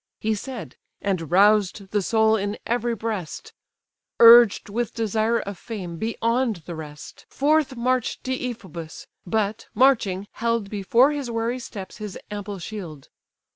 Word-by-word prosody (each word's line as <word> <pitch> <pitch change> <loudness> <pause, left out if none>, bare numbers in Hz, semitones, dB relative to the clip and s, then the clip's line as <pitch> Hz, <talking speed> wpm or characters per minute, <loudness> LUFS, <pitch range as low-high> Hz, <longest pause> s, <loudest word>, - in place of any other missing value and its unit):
He 220 0 0
said; 240 +3 -7 0.2
and 185 -6 -2
roused 200 +1 +3
the 210 - +1
soul 220 +2 +3
in 205 0 -2
every 240 0 0
breast: 210 -6 -5 0.7
Urged 235 -2 +8
with 230 +3 -3
desire 225 0 +1
of 200 -2 -6
fame, 185 -7 -6
beyond 230 -1 -1
the 175 - -6
rest, 150 -2 -10
Forth 295 -1 +1
march'd 250 0 -1
Deiphobus; 220 -11 -5 0.2
but, 215 +2 -1
marching, 210 -6 +3
held 230 -3 -1
Before 230 +7 +3
his 285 -4 -4
wary 230 +2 -2
steps 195 -6 -8
his 210 -3 -7
ample 205 -1 -5
shield. 170 -7 -8
220 Hz, 135 wpm, -24 LUFS, 195-235 Hz, 0.7 s, Urged